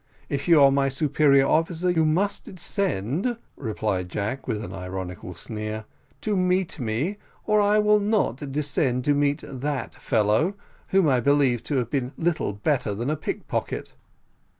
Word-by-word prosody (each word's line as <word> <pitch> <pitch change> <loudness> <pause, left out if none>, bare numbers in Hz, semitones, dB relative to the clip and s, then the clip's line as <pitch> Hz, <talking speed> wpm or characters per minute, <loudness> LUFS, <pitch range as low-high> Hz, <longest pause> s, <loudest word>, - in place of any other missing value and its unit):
If 140 +3 -2
you 165 -3 +7
are 135 - +7
my 135 0 +2
superior 140 0 +3
officer, 165 +4 +1
you 160 -2 +2
must 180 +7 +1
descend," 185 - -1 0.2
replied 105 -6 -2
Jack, 105 +8 -3
with 110 -3 -2
an - - -7
ironical 90 -1 -6
sneer, 110 +2 -5 0.4
"to 210 -1 0
meet 185 -2 +1
me, 125 - -1 0.3
or 210 -1 +3
I 205 +1 +4
will 210 0 +4
not 195 - 0
descend 135 -3 0
to 145 - +4
meet 145 0 +1
that 140 +1 -4
fellow, 115 - +1 0.3
whom 190 -4 +3
I 130 -3 +3
believe 135 -2 +3
to 145 - -1
have 120 -3 -1
been 135 -1 -1
little 165 -9 0
better 105 0 0
than 120 +7 -2
a - - +1
pickpocket." 155 - -4
140 Hz, 155 wpm, -25 LUFS, 115-170 Hz, 0.4 s, you